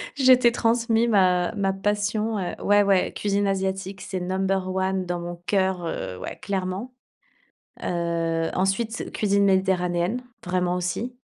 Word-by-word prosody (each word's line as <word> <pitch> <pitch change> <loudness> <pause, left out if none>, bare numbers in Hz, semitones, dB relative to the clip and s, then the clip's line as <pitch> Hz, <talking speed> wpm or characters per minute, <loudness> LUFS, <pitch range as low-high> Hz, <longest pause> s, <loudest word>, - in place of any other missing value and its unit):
Je 260 -2 +6
t'ai 245 -1 +5
transmis 230 0 +2
ma 180 -4 +3
ma 195 -2 +1
passion, 210 +2 -1
heu, 180 - -3
ouais, 205 0 +5
ouais, 195 -2 +2
cuisine 205 0 0
asiatique, 190 0 -2
c'est 190 - -4
number 190 +1 -1
one 190 0 0
dans 175 0 -2
mon 175 0 -5
cœur, 190 -1 +1
heu, 90 - -4
ouais, - - -7
clairement. 195 +5 -3 0.9
Heu, 165 -1 -1
ensuite, 215 +5 -1
cuisine 200 -1 +2
méditerranéenne, 190 +2 +1 0.2
vraiment 180 0 0
aussi. 185 +8 -3
190 Hz, 140 wpm, -24 LUFS, 180-210 Hz, 0.9 s, Je